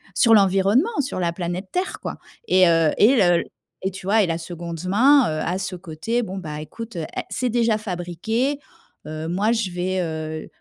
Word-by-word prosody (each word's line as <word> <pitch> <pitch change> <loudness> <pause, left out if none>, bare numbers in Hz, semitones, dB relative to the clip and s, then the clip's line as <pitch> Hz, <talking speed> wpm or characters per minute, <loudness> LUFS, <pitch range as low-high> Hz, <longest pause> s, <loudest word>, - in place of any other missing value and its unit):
sur 230 -3 +5
l'environnement, 205 - +3
sur 270 -7 -4
la 170 -2 0
planète 175 +2 -4
Terre, 365 +1 -2
quoi. - - -4 0.3
Et 185 -1 +5
heu, 165 -2 +3
et 235 +6 +6
le 175 -5 +4 0.4
et 190 - +1
tu 185 0 -10
vois 215 +2 +4
et - - 0
la 165 -1 -1
seconde 170 -1 -7
main, 265 +9 +5
heu, 155 0 -2
a 180 +2 -1
ce 190 0 -4
côté: 180 +7 -3
«Bon, 195 -3 -6
bah, 150 -5 -6
écoute, 220 +7 -8
è 160 - -3 0.3
c'est 255 - -1
déjà 230 -2 +1
fabriqué, 215 - -2 0.5
heu, 155 +1 -5
moi, 195 +6 +1
je 225 -5 -1
vais, 185 +1 -1
heu, 155 -1 -5
185 Hz, 190 wpm, -22 LUFS, 170-225 Hz, 0.5 s, et